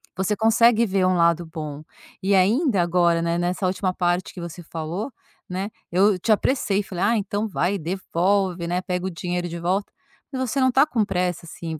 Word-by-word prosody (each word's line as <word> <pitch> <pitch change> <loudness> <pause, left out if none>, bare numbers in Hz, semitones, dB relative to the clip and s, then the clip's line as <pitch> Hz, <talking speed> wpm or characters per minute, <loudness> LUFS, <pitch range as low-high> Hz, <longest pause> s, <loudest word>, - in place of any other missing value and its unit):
você 190 +3 0
consegue 225 +2 +4
ver 195 -3 +1
um 185 0 +3
lado 170 0 +3
bom. 155 -3 -6 0.4
E 195 +1 +2
ainda 210 - +3
agora, 170 -1 +2
né, 170 0 0
nessa 180 +2 -1
última 185 0 0
parte 175 0 -1
que 180 - -8
você 170 +1 -7
falou, 165 - -5 0.4
né, 190 +3 -3 0.2
eu 190 +2 +3
te 220 - 0
apressei, 210 -2 +1
falei: 185 -1 -4
“Ah 225 +3 +3
então 205 +1 -2
vai 195 -1 0
devolve, 185 +1 0
né, 180 +1 -1
pega 180 0 -3
o - - -1
dinheiro 175 0 -3
de 170 +1 -6
volta,” 185 +4 -1 0.4
mas 260 -2 -3
você 275 - -1
não 260 -1 +4
tá 270 +3 +5
com 240 -8 0
pressa 180 -3 -2
assim, 165 -1 -6
185 Hz, 195 wpm, -23 LUFS, 175-205 Hz, 0.4 s, tá